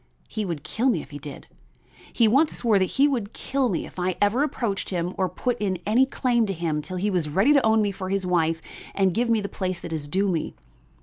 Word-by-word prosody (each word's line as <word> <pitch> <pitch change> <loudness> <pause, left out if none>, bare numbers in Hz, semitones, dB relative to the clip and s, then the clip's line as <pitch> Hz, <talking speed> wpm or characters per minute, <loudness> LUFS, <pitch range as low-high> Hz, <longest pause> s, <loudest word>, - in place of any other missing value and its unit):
"He 215 -1 -3
would 165 -6 -4
kill 250 +4 0
me 175 - 0
if - - -17
he 145 - -7
did; 145 -1 -9 0.7
he 230 - +4
once 280 +8 +3
swore 220 -5 +3
that 190 - +3
he 275 +9 +3
would 235 -7 -2
kill 270 -2 -1
me 175 - -2
if - - -10
I 180 0 0
ever 205 +6 +2
approached 235 -9 -1
him 180 -1 -2
or 185 -1 0
put 245 +7 -2
in 190 -3 -1
any 245 +6 +4
claim 240 -4 +1
to 195 - -1
him 160 -3 -2
till 185 +5 -6
he 205 +3 0
was 170 -5 0
ready 195 - +4
to 280 -3 +4
own 220 -1 +4
me 205 - 0
for 185 -1 -6
his 195 -1 -1
wife 165 -2 +1 0.3
and 190 -2 +2
give 235 +4 0
me 225 -2 +3
the 200 - -3
place 185 -2 -3
that 170 - -6
is 150 -2 -4
due 195 +6 +1
me. 170 -5 -2
195 Hz, 250 wpm, -25 LUFS, 175-230 Hz, 0.7 s, he